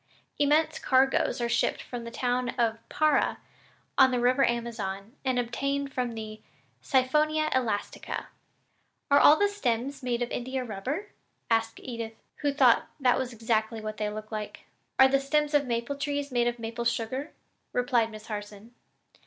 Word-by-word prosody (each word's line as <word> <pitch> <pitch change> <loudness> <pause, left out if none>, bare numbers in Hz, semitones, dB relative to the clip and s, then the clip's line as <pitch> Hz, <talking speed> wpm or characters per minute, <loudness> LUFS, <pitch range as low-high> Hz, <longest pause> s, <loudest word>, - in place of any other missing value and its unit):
Immense 310 +2 +3
cargoes 265 -1 +2
are 240 - 0
shipped 235 0 +1
from 240 -2 -7
the - - -5
town 245 +1 -1
of 230 -2 +1
Para, 310 -2 +2 0.6
on 265 - +8
the 250 -1 0
river 255 +3 +3
Amazon, 230 -3 -2
and 260 -2 0
obtained 275 +3 -1
from 245 -2 -2
the 215 -1 -7 0.4
Siphonia 305 +4 +2
elastica." 225 -6 -2 0.8
"Are 290 +2 +7
the 410 - +4
stems 275 - -2
all - - -9
made 240 0 +1
of 240 - -5
India 260 +1 -3
rubber?" 260 - -4 0.4
asked 225 0 +1
Edith, 230 -3 -5 0.2
who 290 -1 0
thought 260 -4 +4
that 255 -3 +3
was 260 -1 -3
exactly 225 -1 -1
what 215 0 -5
they 210 -1 -1
looked 215 +1 -7
like. 215 -1 -5 0.4
"Are 265 - +8
the 270 +1 +3
stems 295 +2 0
of 290 - +5
the 280 - -9
maple 235 +3 -2
trees 285 0 -2
made 240 -1 +2
of 240 0 -1
maple 230 +1 -5
sugar?" 240 +5 -2 0.4
replied 245 -2 +2
Miss 215 -1 -10
Harson. 210 +1 -7
245 Hz, 160 wpm, -28 LUFS, 225-275 Hz, 0.8 s, on